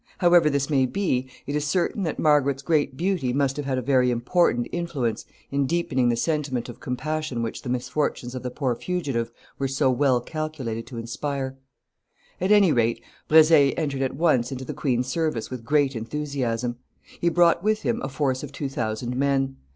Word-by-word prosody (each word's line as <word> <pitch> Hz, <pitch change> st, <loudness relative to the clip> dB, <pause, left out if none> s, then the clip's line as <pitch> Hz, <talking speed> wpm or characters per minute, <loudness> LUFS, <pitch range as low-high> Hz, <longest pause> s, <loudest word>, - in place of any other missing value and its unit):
However 175 Hz, -3 st, +5 dB
this 140 Hz, -1 st, 0 dB
may 135 Hz, -4 st, +2 dB
be, 130 Hz, -7 st, -1 dB, 0.2 s
it 145 Hz, -, -3 dB
is 150 Hz, -, 0 dB
certain 175 Hz, +7 st, 0 dB
that 160 Hz, -5 st, -2 dB
Margaret's 140 Hz, -3 st, +2 dB
great 150 Hz, -4 st, +1 dB
beauty 175 Hz, -8 st, 0 dB
must 135 Hz, 0 st, +1 dB
have 145 Hz, -1 st, -4 dB
had 130 Hz, -1 st, 0 dB
a 130 Hz, -, -2 dB
very 130 Hz, -1 st, +3 dB
important 120 Hz, +1 st, +1 dB
influence 150 Hz, -10 st, -2 dB, 0.3 s
in 140 Hz, -1 st, +1 dB
deepening 135 Hz, -6 st, +1 dB
the 120 Hz, -, +2 dB
sentiment 130 Hz, -3 st, -1 dB
of 120 Hz, -, -9 dB
compassion 130 Hz, 0 st, -3 dB
which 115 Hz, -, -4 dB
the 125 Hz, -, -6 dB
misfortunes 125 Hz, 0 st, -2 dB
of 130 Hz, -, -5 dB
the 125 Hz, -, -3 dB
poor 130 Hz, 0 st, -1 dB
fugitive 135 Hz, -6 st, -2 dB, 0.3 s
were 135 Hz, -, 0 dB
so 135 Hz, 0 st, +2 dB
well 130 Hz, -1 st, +3 dB
calculated 130 Hz, -6 st, -5 dB
to 120 Hz, -2 st, -8 dB
inspire. 130 Hz, +3 st, -3 dB, 0.9 s
At 185 Hz, +3 st, +1 dB
any 205 Hz, -5 st, +6 dB
rate, 115 Hz, -3 st, +1 dB, 0.3 s
Brezé 155 Hz, -3 st, +6 dB
entered 140 Hz, -4 st, -1 dB
at 135 Hz, -1 st, -1 dB
once 135 Hz, -6 st, +2 dB
into 130 Hz, 0 st, -5 dB
the -, -, -5 dB
queen's 125 Hz, -3 st, 0 dB
service 130 Hz, -4 st, -2 dB
with 125 Hz, -3 st, -6 dB
great 140 Hz, +1 st, +2 dB
enthusiasm. 120 Hz, -1 st, -2 dB, 0.4 s
He 170 Hz, -, +2 dB
brought 170 Hz, 0 st, +3 dB
with 215 Hz, +1 st, +1 dB
him 235 Hz, +1 st, 0 dB
a -, -, -3 dB
force 130 Hz, -1 st, -1 dB
of 145 Hz, -, -7 dB
two 140 Hz, 0 st, -4 dB
thousand 120 Hz, -1 st, -3 dB
men. 135 Hz, 0 st, 0 dB
135 Hz, 185 wpm, -25 LUFS, 125-155 Hz, 0.9 s, any